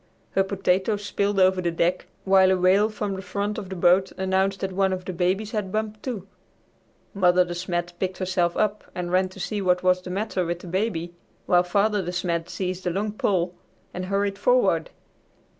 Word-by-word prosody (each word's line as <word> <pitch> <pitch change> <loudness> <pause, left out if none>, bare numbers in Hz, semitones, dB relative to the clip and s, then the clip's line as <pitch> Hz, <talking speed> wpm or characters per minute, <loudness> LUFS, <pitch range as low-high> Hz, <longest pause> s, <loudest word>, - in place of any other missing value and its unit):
Her 195 - +2
potatoes 195 +2 0
spilled 200 0 0
over 185 0 +4
the 175 - 0
deck, 170 +2 0 0.2
while 190 -1 +5
a 190 - +3
wail 190 +4 +4
from 210 -2 -3
the 190 - -5
front 200 +3 -3
of 195 -3 -8
the 190 - -5
boat 180 +2 +3
announced 190 +1 0
that 190 - -2
one 190 0 +1
of 185 -1 -5
the 185 - -4
babies 190 +5 0
had 210 -4 -3
bumped, 215 0 -3
too. 215 -8 -5 0.9
Mother 180 -2 +4
De 175 - -5
Smet 175 0 -3
picked 190 -1 -2
herself 180 -2 0
up 210 0 0
and 175 -1 -3
ran 185 +1 +2
to 185 - -13
see 205 +2 -2
what 180 -1 +2
was 185 0 +3
the 180 - -8
matter 190 0 -1
with 175 0 -2
the - - -10
baby, 175 -2 -2 0.3
while 175 -1 +4
Father 200 +3 +1
De 175 - -3
Smet 175 -2 -2
seized 185 -1 -3
a - - +3
long 200 +4 -1
pole 185 -4 0 0.4
and 185 +1 -4
hurried 200 +1 -1
forward. - - +2
190 Hz, 200 wpm, -25 LUFS, 180-200 Hz, 0.9 s, while